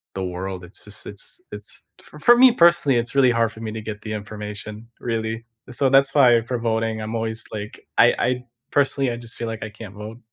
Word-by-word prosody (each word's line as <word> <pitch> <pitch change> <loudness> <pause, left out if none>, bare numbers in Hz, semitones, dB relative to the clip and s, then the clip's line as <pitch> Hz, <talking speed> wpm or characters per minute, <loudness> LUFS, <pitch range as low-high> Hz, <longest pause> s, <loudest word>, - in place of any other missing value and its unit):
the 95 - -2
world. 90 0 -4
It's 90 +3 -12
just 105 +1 -7
it's 105 - -7
it's - - -8 0.2
f - - -14
for 240 0 +7
me, 255 0 +8
personally 170 - +4
it's 120 +3 -2
really, 130 -3 +5
hard 115 -1 +2
for 110 - -11
me 110 -1 -4
to 110 - -5
get 110 -1 -6
the 110 - -5
information, 105 +1 -7
really 115 -1 -3 0.3
so, 135 +2 +2
that's 135 +1 +4
why 120 -4 +6
for 125 - -1
voting 110 -1 -1
I'm 110 +1 -5
always 110 0 -3
like 105 0 -7
I - - +7
I 125 0 0 0.3
personally 135 -2 +2
I 120 - -4
just 120 -1 -10
feel 115 - -3
like 115 -1 -5
I 105 - -5
can't 105 -1 -10
vote. 110 +3 -8
115 Hz, 220 wpm, -23 LUFS, 105-125 Hz, 0.3 s, me